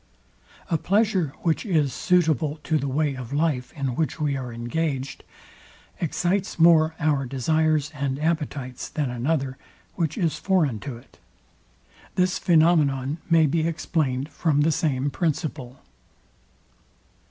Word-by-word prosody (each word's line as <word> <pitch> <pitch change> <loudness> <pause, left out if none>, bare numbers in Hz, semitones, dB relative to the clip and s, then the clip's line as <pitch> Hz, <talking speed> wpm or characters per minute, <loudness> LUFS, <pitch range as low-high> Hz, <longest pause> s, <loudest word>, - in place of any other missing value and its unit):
A 165 - +2
pleasure, 195 -6 +1
which 165 -2 +1
is 155 - +1
suitable 160 - +1
to 155 -1 +1
the 140 - -2
way 145 +2 0
of 130 -2 -8
life, 145 -4 0
in 140 -5 -2
which 160 +2 -1
we 145 -2 0
are 130 -2 -5
engaged, 130 +3 -3 0.8
excites 180 +3 -1
more 160 -1 +5
our 145 -4 +1
desires 155 +3 +1
and 140 -2 -2
appetites 145 -5 -2
than 145 -5 -2
another, 130 +1 -1 0.4
which 165 -5 -2
is 165 -4 0
foreign 160 - +1
to 130 +1 -6
it. 120 - -20 1.0
This 185 0 +1
phænomenon 155 -5 +3
may 165 -2 +5
be 160 +2 +1
explained 150 -4 -1
from 150 -4 +1
the 160 +2 +3
same 145 -3 0
principle. 150 -6 -3
150 Hz, 130 wpm, -24 LUFS, 135-165 Hz, 1.0 s, more